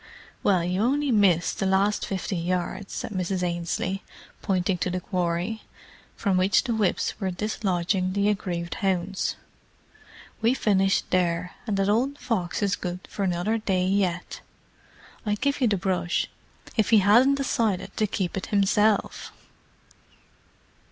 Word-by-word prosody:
"Well, 185 -4 +3
you 180 +3 -1
only 280 +4 +1
missed 190 -6 +3
the 195 - +1
last 195 +2 +2
fifty 190 0 -3
yards," 180 +3 -2
said - - -5
Mrs. 185 -1 -2
Ainslie, 175 +2 -2 0.4
pointing 185 -2 0
to - - 0
the 185 +1 -2
quarry, 180 +4 -2 0.5
from 195 -4 +1
which 185 +2 +3
the 240 - -1
whips 210 -2 0
were 190 -3 -1
dislodging 185 -2 -1
the 200 +1 +1
aggrieved 175 -4 -2
hounds. 190 0 0 1.1
"We 230 +3 +3
finished 195 -5 +1
there; 180 -1 +1 0.2
and 205 -2 0
that 195 0 +1
old 250 +7 +1
fox 210 -8 -2
is 200 -1 +2
good 180 0 -5
for - - -5
another 190 +4 0
day 190 -4 0
yet. 185 -2 -1 0.8
I'd 210 -1 -1
give 280 +1 0
you 250 - +4
the 205 -2 +1
brush, 180 -1 0 0.5
if 220 -3 +2
he 225 - +6
hadn't 235 +8 +5
decided 220 -8 -1
to 215 - +2
keep 190 -3 -2
it 190 - -4
himself." 205 +1 +1
195 Hz, 145 wpm, -26 LUFS, 180-210 Hz, 1.1 s, he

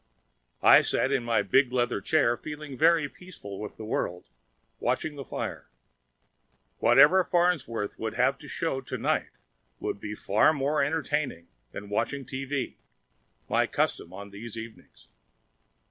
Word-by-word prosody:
I - - +9
sat 135 - 0
in 135 -3 +1
my 115 -3 +1
big 125 +6 +3
leather 120 -5 0
chair, 125 0 +2
feeling 150 0 -8
very 160 +1 +4
peaceful 140 - -10
with 105 - -7
the 110 - -7
world, 90 -4 -2 0.6
watching 130 +5 -1
the 140 - -6
fire. - - -5 1.1
Whatever 190 0 +6
Farnsworth 170 - 0
would - - -3
have - - +2
to - - -12
show 135 - -2
to 130 - -5
night - - 0 0.5
would - - -3
be 105 +1 -5
far 105 +10 +3
more 145 0 +1
entertaining 145 - -2 0.2
than 105 - -8
watching 115 +6 -2
T.V. 135 +1 -4 0.7
my - - +2
custom - - -1
on 100 +2 -9
other 100 - -12
evenings. 115 0 -10
130 Hz, 140 wpm, -28 LUFS, 105-150 Hz, 1.1 s, I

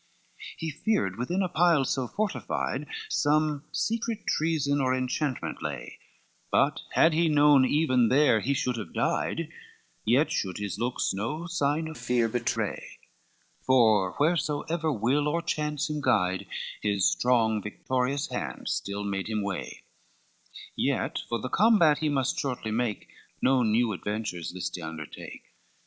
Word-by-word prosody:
XXX - - -16
He 160 -1 -3
feared 155 - 0
within 175 +10 0
a - - +1
pile 170 -4 +3
so 130 -1 -1
fortified 210 - -2 0.2
Some 150 - +1
secret 230 -1 -2
treason 145 -3 +1
or 130 -1 +2
enchantment 130 +1 -2
lay, - - -6 0.5
But - - +2
had 160 - +5
he 165 +1 +3
known 145 -3 +6
even 130 -5 +3
there 130 -4 +4
he 140 +7 0
should 125 -2 -1
have 110 - -7
died, - - -1 0.5
Yet 130 +8 +3
should 95 -3 -2
his 105 -1 -4
looks 125 +1 0
no 115 - -3
sign 160 -2 0
of 160 - -8
fear 120 -2 +1
betray; 120 +1 -3 0.6
For 110 -7 +4
wheresoever 155 +1 0
will 135 +5 +1
or 160 +3 +1
chance 150 -2 -1
him 150 -1 -3
guide, 95 -8 +1 0.3
His 100 -2 +2
strong 115 -4 +2
victorious 130 +6 -1
hand 65 -5 -4
still 100 +1 -2
made 100 0 -3
him 105 -2 -1
way: 100 -2 -5 0.9
Yet - - 0
for 115 - -1
the 130 - -4
combat 175 - +4
he 155 0 0
must 135 -3 0
shortly 125 -5 -3
make, 115 -1 -2 0.3
No 130 0 +3
new 115 0 +2
adventures 105 -4 -4
list 90 0 -4
he - - -8
undertake. 80 -2 -8
130 Hz, 145 wpm, -27 LUFS, 110-155 Hz, 0.9 s, known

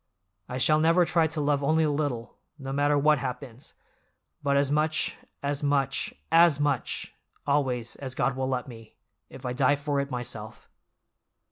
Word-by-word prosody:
"I 125 - -3
shall 155 +4 +4
never 165 +3 +4
try 165 -1 +2
to 160 0 -4
love 145 -1 +1
only 160 +3 +3
a 150 - +2
little, 145 -6 -3 0.2
no 135 -2 -6
matter 145 +1 +2
what 150 0 +4
happens, 125 -1 -6 0.7
but 140 -1 +2
as 140 0 +2
much, 155 +1 +1 0.3
as 140 0 -1
much, 140 -3 0 0.2
as 165 -3 +6
much, 145 -3 -1 0.3
always, 130 -5 0
as 130 -2 -6
God 130 -1 0
will 130 0 -2
let 125 -1 -2
me, 115 -3 -12 0.3
if 130 - -11
I 125 - -2
die 135 +2 +3
for 145 0 -2
it 140 0 -2
myself!" 120 -4 -6
140 Hz, 165 wpm, -27 LUFS, 130-150 Hz, 0.7 s, as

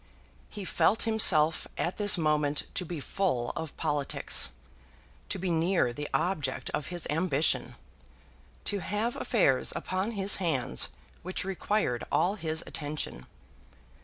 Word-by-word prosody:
He 205 -2 -7
felt 210 +3 +2
himself 165 -8 +4
at 175 - -2
this 205 -2 +5
moment 150 -2 +1
to 180 - -1
be 170 -1 -5
full 140 -7 -1
of 160 -3 -6
politics, 145 -3 +1 0.8
to - - -2
be 185 -1 -2
near 165 -6 +2
the 145 +3 -5
object 155 -8 -1
of 150 - -3
his 175 -2 -2
ambition, 160 -2 +1 0.9
to 205 - +1
have 210 +7 -2
affairs 145 - +2
upon 190 +5 -2
his 200 -1 +2
hands 140 - +1 0.3
which 185 +1 -3
required 195 - -1
all 185 +3 +2
his 160 -5 -2
attention. 145 - -5
170 Hz, 130 wpm, -29 LUFS, 150-195 Hz, 0.9 s, this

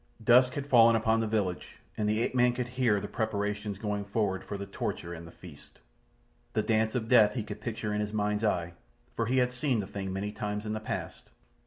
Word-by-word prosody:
Dusk 125 +2 +6
had 140 - -4
fallen 115 -4 +6
upon 110 0 +2
the 115 - 0
village, 100 -5 -2 0.2
and 105 -1 0
the 110 +1 +1
ape - - -1
man 125 -1 +4
could 125 0 -3
hear 125 -5 +2
the 100 - -5
preparations 105 -2 -2
going 105 -1 -2
forward 100 -2 -1
for 100 - -5
the 100 - -5
torture 85 -3 -4
and 85 0 -9
the - - -12
feast. 80 -6 -14 0.7
The 110 - +1
dance 110 +1 +1
of 115 -3 -1
death 110 -3 +5
he 115 - -1
could 105 - -8
picture 110 -2 -3
in 105 - 0
his 105 0 -3
mind's 105 0 -1
eye—for 85 - -3
he 130 +2 +1
had 125 -1 +3
seen 125 -1 0
the 100 - -2
thing 100 -1 -5
many 100 +2 -3
times 105 0 -4
in 105 - -2
the 110 - -2
past. 110 - -6
105 Hz, 220 wpm, -29 LUFS, 100-115 Hz, 0.7 s, Dusk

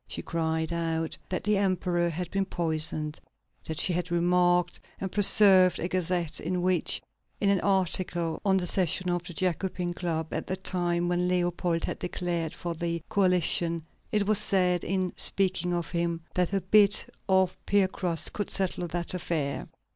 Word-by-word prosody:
She - - -5
cried 160 0 -2
out 165 -1 -2
that 185 - -3
the 210 -1 +2
Emperor 180 -3 0
had 170 +1 -5
been 195 0 0
poisoned; 155 -3 -2 0.5
that 160 0 -4
she 180 - +1
had 175 +1 -2
remarked 175 0 +2 0.2
and 190 -1 -4
preserved 195 -3 +7
a 175 - -2
gazette 175 -3 -1
in 180 +2 -2
which, 185 -2 0 0.4
in 200 - +2
an 195 - +2
article 180 -3 0
on 195 -2 +3
the 180 - -1
session 180 0 +1
of 175 0 -1
the 175 - -9
Jacobin 180 0 -2
Club 165 -3 -3
at - - -3
the 185 - -3
time 175 -2 -1
when 175 0 0
Leopold 175 -2 0
had - - -4
declared 175 -3 -3
for 175 -1 -4
the 170 0 -3
Coalition, 175 -3 +1 0.3
it 210 -1 +1
was 210 0 +3
said, 180 -4 +1
in 185 -1 -1
speaking 185 -2 +2
of 175 -1 -3
him, 170 -1 -1
that 180 0 0
a 195 -1 0
bit 205 +2 +4 0.2
of 190 -1 +3
piecrust 185 -4 +1
could 205 - -3
settle 185 -2 -2
that 170 +1 -3
affair. 160 -5 -3
175 Hz, 165 wpm, -27 LUFS, 170-185 Hz, 0.5 s, preserved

